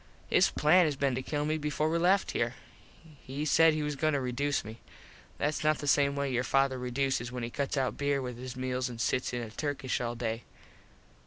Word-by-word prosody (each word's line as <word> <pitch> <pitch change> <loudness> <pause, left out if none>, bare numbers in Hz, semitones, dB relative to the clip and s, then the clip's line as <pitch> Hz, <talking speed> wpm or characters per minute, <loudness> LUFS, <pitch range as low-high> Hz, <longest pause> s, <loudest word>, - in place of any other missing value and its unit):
His - - +5
plan 175 +4 +4
has 150 -2 0
been 135 -1 0
to 130 - -2
kill 145 +2 -2
me 155 +1 0
before 150 +1 -1
we 165 +1 +1
left 190 +3 +3
here. 115 +2 -1 0.7
He 140 +3 -4
said 160 +1 +5
he 155 - -1
was 150 -1 -2
goin 155 +2 +1
to 140 - +1
reduce 135 +2 -1
me. 110 +2 -9 0.6
Thats 150 +1 -1
not 155 0 +3
the - - -6
same 140 0 +3
way 140 -1 -1
your 120 +1 +1
father 135 0 +2
reduces 125 -1 -1
when 125 -1 -5
he 115 - -4
cuts 140 +2 -2
out 130 -2 0
beer 140 -1 +1
with 125 -2 -5
his 130 0 -6
meals 130 0 -2
an 120 - -8
sits 125 +2 0
in 120 -1 -3
a 110 - -7
Turkish 140 0 -2
all 120 0 -2
day. 115 -1 -3
135 Hz, 225 wpm, -30 LUFS, 125-150 Hz, 0.7 s, His